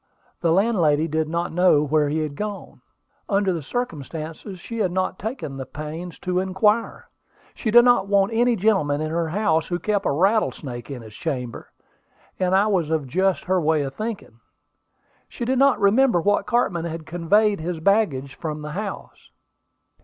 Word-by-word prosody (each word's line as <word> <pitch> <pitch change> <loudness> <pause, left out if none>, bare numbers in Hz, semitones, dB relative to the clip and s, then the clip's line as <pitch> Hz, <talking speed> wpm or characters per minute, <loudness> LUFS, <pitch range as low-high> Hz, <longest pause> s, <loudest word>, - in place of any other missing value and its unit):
The 170 - +1
landlady 165 -6 +2
did 155 0 -1
not 170 +1 -2
know 175 -4 +4
where 150 0 +1
he 155 +2 -1
had 150 -2 -5
gone. 210 +3 -6 0.5
Under 200 -2 +2
the 165 - -3
circumstances, 165 - -5
she 230 +6 -7
had 190 -5 +1
not 185 0 -2
taken 215 - -5
the 135 - -5
pains 160 +4 -7
to 180 -1 0
inquire. 200 +4 0 0.5
She 220 - -3
did 240 +2 +7
not 245 -6 +4
want 200 +1 +2
any 240 +1 +3
gentleman 190 -9 +1
in 155 0 -3
her 165 0 -1
house 165 -3 +1
who 175 - -1
kept 205 +3 -1
a - - +2
rattlesnake 150 - 0
in 130 -4 -7
his 110 -1 -12
chamber; 125 -7 -5 0.7
and 185 0 +2
I 195 +2 +4
was 185 -7 0
of 160 -3 0
just 185 +7 0
her 185 -1 +1
way 155 -1 +2
of 135 -1 -5
thinking. 215 - -6 0.9
She 240 - -5
did 255 +1 +1
not 275 -1 +4
remember 215 +1 +4
what 205 +4 +1
cartman 185 -9 0
had 165 -1 -5
conveyed 195 +6 +2
his 165 +1 -4
baggage 160 -8 +1
from 155 -2 -5
the 150 - -6
house. 200 +4 -7
180 Hz, 175 wpm, -23 LUFS, 155-205 Hz, 0.9 s, did